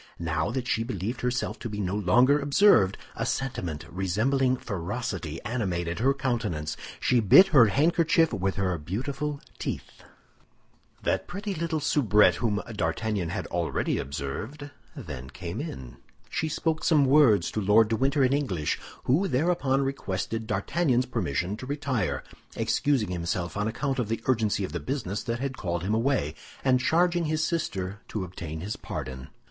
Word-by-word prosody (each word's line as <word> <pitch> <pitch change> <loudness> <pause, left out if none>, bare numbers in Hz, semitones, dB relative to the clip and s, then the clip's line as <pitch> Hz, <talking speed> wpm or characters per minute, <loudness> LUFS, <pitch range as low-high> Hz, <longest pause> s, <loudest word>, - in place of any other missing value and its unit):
Now 80 +1 -1
that 125 +1 -3
she 115 - +1
believed 115 +1 -4
herself 125 0 -1
to 120 - -5
be 105 -1 -5
no 95 -1 -1
longer 125 +9 +4
observed, 140 - +4 0.2
a - - -2
sentiment 90 - -3
resembling 125 +9 +1
ferocity 95 -5 -4
animated 90 -7 -2
her 130 +4 +4
countenance. 115 - -2 0.2
She 125 - +3
bit 150 - +7
her 135 -10 +7
handkerchief 165 - +3
with 95 0 -1
her 95 -2 0
beautiful 135 - -3 0.2
teeth. - - -5 1.0
That - - 0
pretty 200 +2 -4
little 165 -2 -1
soubrette 115 -8 +4
whom 105 -4 0
D'Artagnan 100 0 -1
had - - -3
already - - -1
observed 105 - -5 0.2
then 65 +1 -7
came - - -5
in. 65 -2 -7 0.3
She 160 - -1
spoke 160 +1 -1
some 150 -4 +4
words 130 - +5
to 110 - -2
Lord 105 +3 +5
de 115 - +1
Winter 135 +4 +2
in 130 +1 +3
English, 95 - -1 0.2
who 165 +10 +2
thereupon 140 -3 +1
requested 115 -4 -3
D'Artagnan's 125 - +1
permission 95 - -2
to 130 - -8
retire, 130 - -1 0.3
excusing 130 -10 +1
himself 85 0 -2
on 105 +1 0
account 135 +4 -2
of 115 -4 -1
the 115 0 -2
urgency 110 -5 +1
of 95 - -4
the - - -3
business 115 -8 -3
that 120 0 -2
had 135 0 -3
called 85 -3 -2
him 100 +3 0
away, 115 - +1 0.3
and 130 -1 +4
charging 175 +4 +2
his 155 0 0
sister 100 - -2
to 105 - -3
obtain 85 -3 -6
his 100 +5 -4
pardon. 65 0 -6
115 Hz, 155 wpm, -27 LUFS, 95-140 Hz, 1.0 s, bit